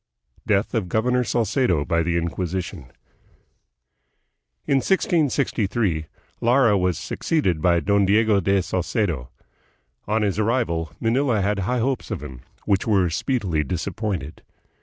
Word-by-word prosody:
Death 100 +1 +1
of 105 -7 -1
Governor 125 +4 +1
Salcedo 115 - +1
by 85 0 +1
the 85 +1 0
Inquisition. 85 -5 -4 1.7
In 140 - +2
1663, 120 - 0 0.3
Lara 120 -2 +4
was 90 -4 +1
succeeded 95 - -1
by 85 +1 +3
Don 100 -1 +2
Diego 105 0 +3
de 95 0 +1
Salcedo. 90 - -2 0.8
On 110 +1 +1
his 100 -1 0
arrival, 105 -9 0
Manila 120 0 +1
had 100 +1 0
high 110 +7 -1
hopes 130 +2 -1
of - - -4
him, 65 -4 -9 0.2
which 100 0 +1
were 95 -6 +2
speedily 95 - -1
disappointed. 90 0 -4
100 Hz, 120 wpm, -23 LUFS, 85-115 Hz, 1.7 s, Lara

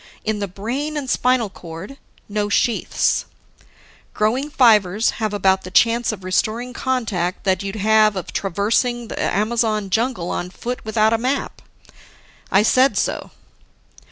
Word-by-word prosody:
In 215 -1 -1
the 200 - -2
brain 250 - -4
and 280 -3 -4
spinal 250 -4 +1
cord, 175 +10 -10 0.3
no 205 0 -2
sheaths; 230 +3 +1 0.9
growing 245 +7 0
fibers 220 - +4
have 215 -1 0
about 190 -2 +2
the 185 - -9
chance 230 +5 +3
of 200 -3 -8
restoring 225 +6 -1
contact 220 -9 -2
that 190 -2 +1
you'd 200 +1 -5
have 215 0 +3
of 185 - -6
traversing 225 +5 0
the - - -4
Amazon 215 -1 0
jungle 225 -5 0
on 180 - -3
foot 245 +6 -6
without 220 0 +2
a 225 - +1
map. 260 +4 -2 0.9
I 195 +2 +5
said 260 +4 +3
so. - - -1
215 Hz, 140 wpm, -20 LUFS, 195-240 Hz, 0.9 s, I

